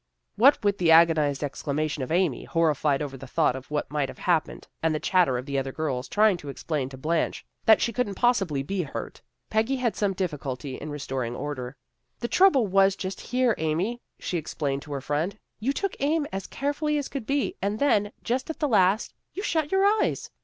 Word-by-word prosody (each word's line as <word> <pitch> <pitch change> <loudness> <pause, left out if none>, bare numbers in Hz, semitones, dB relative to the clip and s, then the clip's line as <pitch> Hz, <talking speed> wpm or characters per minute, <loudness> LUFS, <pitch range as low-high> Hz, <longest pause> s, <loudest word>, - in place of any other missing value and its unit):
What 260 +3 +5
with 205 -1 +1
the 170 -2 +2
agonized 160 -4 +5
exclama 145 +2 -2
tions 150 -2 -4
of - - -9
Amy, 170 -5 +1
horrified 150 -3 +1
over 135 -2 -6
the 135 +1 -10
thought 125 - +2
of 130 0 -9
what 150 -1 -2
might 145 -2 0
have - - -9
happened, 170 -4 0
and 160 -1 +1
the - - -1
chatter 175 -10 +2
of 125 - -5
the 140 -1 -1
other 135 0 -3
girls, 135 -4 -3
trying 210 -3 +3
to 145 -4 -9
explain 140 -1 -3
to 130 - -10
Blanche 160 +5 -1 0.2
that 220 - +6
she 235 - 0
couldn't 210 -4 -1
possibly 195 - +1
be 195 +6 -2
hurt, 150 - -6 0.3
Peggy 220 +5 +2
had 250 -3 0
some 200 -2 0
difficulty 145 -7 -4
in 155 - -7
restoring 135 -5 -3
order. 130 -3 -5 0.2
" - - -50
The 235 - -1
trouble 325 - +5
was 195 0 +4
just 190 -1 -5
here, 250 -2 +1
Amy," 175 +10 -1 0.2
she 175 - -2
ex 155 - -8
plained 140 -3 -1
to 145 - -8
her 140 - -3
friend. 155 +9 -2
" - - -53
You 250 +6 0
took 395 +6 -2
aim 295 +2 +1
as 195 -1 -4
care 285 +1 -2
fully 300 0 0
as 285 - -2
could 270 -6 -6
be, 280 0 0
and 200 +2 -1
then, 210 -6 +2
just 255 +4 -1
at 320 - -4
the 300 - +1
last, 205 -3 +3 0.2
you 395 - -4
shut 315 -6 0
your 385 +1 +3
eyes. 420 +1 +1
180 Hz, 220 wpm, -26 LUFS, 145-235 Hz, 0.3 s, that